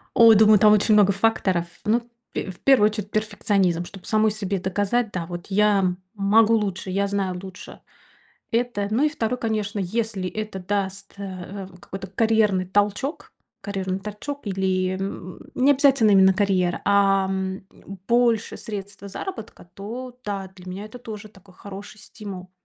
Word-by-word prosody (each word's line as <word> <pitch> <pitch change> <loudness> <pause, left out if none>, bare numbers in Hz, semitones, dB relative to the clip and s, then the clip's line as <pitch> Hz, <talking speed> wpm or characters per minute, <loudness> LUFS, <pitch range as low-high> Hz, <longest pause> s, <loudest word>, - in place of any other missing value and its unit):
Ой, 230 -1 +8
думаю, 215 0 +6
там 210 +1 +6
очень 215 +1 +4
много 200 -1 +5
факторов. 195 -4 +1 0.2
Ну 220 +3 +2 0.3
пь - - -3
в 180 - -12
первую 235 -6 +5
очередь, 210 -1 -6
перфекционизм, 200 -5 0
чтоб 195 +1 -12
самой 215 0 +3
себе 200 -2 -2
доказать. 205 +5 0
Да, 175 -2 -3
вот 175 0 -7
я, 205 0 +3
м, 180 -1 0 0.2
могу 215 +3 +4
лучше, 195 -3 -1
я 200 +2 +1
знаю 195 -2 -2
лучше 190 0 -10 0.7
это. 230 -4 0
Ну 245 +7 +2
и - - +4
второе, 250 -5 -2
конечно, 215 -3 -2
если 200 0 -2
это 215 +1 -5
даст, 195 +1 -3
э, - - -6
э, 190 +1 -7
в 180 -1 -16
какой-то 195 0 -7
карьерный 210 -2 +2
толчок, 205 - -1 0.3
карьерный 190 -2 -3
торчок 210 +7 -7
или, 185 -1 0
м, 190 -2 -6
не 270 +3 +4
обязательно 270 -6 +4
именно 190 -1 +6
карьера. 185 -3 +1
Ам, 195 -1 +2 0.5
больше 235 -2 +2
средства 200 -1 -7
заработка, 225 - -7
то 245 +5 -7
да, 195 -2 -4
для 180 0 -14
меня 195 +3 -6
это 215 +4 -10
тоже 215 -3 -8
такой 190 -2 -20
хороший 205 +1 -10
стимул. 190 -4 -9
200 Hz, 160 wpm, -23 LUFS, 190-220 Hz, 0.7 s, Ой